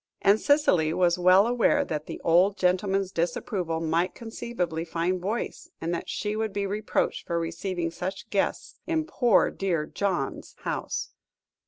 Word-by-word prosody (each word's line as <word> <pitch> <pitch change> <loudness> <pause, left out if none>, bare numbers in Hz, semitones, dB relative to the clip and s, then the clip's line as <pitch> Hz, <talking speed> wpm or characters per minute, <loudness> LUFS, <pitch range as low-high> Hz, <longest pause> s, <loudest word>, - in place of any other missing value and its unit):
And 205 +2 +5
Cicely 185 - +3
was 175 0 +2
well 185 +3 +6
aware 240 0 +2
that 150 -1 -4
the - - -6
old 185 +5 +4
gentleman's 190 +1 +1
disapproval 170 -1 -1
might 165 +3 0
conceivably 220 -8 -4
find 175 +2 -1
voice, 210 +6 -3
and 165 +1 -2
that 170 - -4
she 210 0 -2
would 220 -1 -1
be 200 0 -1
reproached 210 +2 -1
for 170 0 0
receiving 170 +1 -3
such 185 +3 -5
guests 200 - -1
in 320 -2 0
"poor 245 -9 +3
dear 175 -6 -1
John's" 180 -6 -3
house. - - -3
185 Hz, 150 wpm, -27 LUFS, 170-205 Hz, -, well